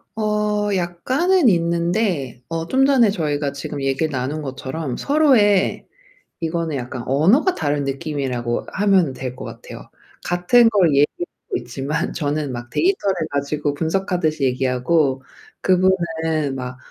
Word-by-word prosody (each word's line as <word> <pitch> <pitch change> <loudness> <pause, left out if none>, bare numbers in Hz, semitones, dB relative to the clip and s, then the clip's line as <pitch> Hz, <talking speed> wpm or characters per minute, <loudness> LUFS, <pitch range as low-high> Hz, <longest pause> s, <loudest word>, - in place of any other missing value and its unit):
어 210 -1 0
약간은 255 - +1
있는데 170 - 0
어 165 0 -3
좀 265 +1 +3
전에 260 -6 +4
저희가 150 -6 -1
지금 140 0 -6
얘기를 135 +4 0
나눈 135 +3 -3
것처럼 135 0 -5
서로의 255 -10 +3 0.5
이거는 165 -1 -2
약간 125 -1 -5
언어가 195 - +3
다른 145 -2 -1
느낌이라고 135 -4 -3
하면 190 -8 +2
될 130 -1 -6
것 - - -8
같아요. - - -10 0.4
같은 180 +7 +4
걸 200 -6 +3
얘기하고 145 +4 +2 0.4
있지만 135 +8 -3
저는 145 -2 -2
막 120 -1 -7
데이터를 340 - +1 0.2
가지고 145 +1 -1
분석하듯이 160 -1 -1
얘기하고 130 +2 +1 0.4
그분은 165 -6 +1
막 125 -1 -6
160 Hz, 290 characters per minute, -21 LUFS, 135-195 Hz, 0.5 s, 전에